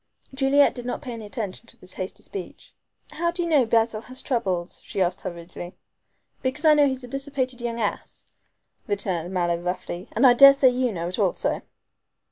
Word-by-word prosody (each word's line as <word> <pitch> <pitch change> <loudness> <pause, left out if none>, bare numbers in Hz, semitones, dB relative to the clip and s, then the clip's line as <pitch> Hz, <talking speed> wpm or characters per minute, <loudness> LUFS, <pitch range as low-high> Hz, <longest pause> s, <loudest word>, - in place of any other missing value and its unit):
Juliet 275 +1 +4
did 245 -1 -7
not 250 - -4
pay 250 -3 -5
attention 210 0 -5
to - - -14
this 185 0 -10
hasty 185 0 -6
speech. 190 -3 -8 0.4
"How 340 +1 -1
do 345 +1 -2
you - - -2
know 290 -7 +3
Basil 225 -1 +2
has 255 +3 -7
troubles?" 190 -9 -2
she - - -5
asked 180 -1 +1
hurriedly. 175 +1 -8 0.7
"Because 270 +5 -2
I 310 - +8
know 295 -1 +5
he's 260 -1 -3
a - - -8
dissipated 270 -1 -3
young 235 -1 -3
ass," 210 -3 -3 0.6
returned 190 -4 -1
Mallow 175 -2 0
roughly; 180 0 -5
"and 235 +5 +3
I 250 - +8
daresay 275 +1 +8
you 250 -1 0
know 170 -3 -4
it 185 - -5
also." 195 -4 0
235 Hz, 180 wpm, -24 LUFS, 185-270 Hz, 0.7 s, I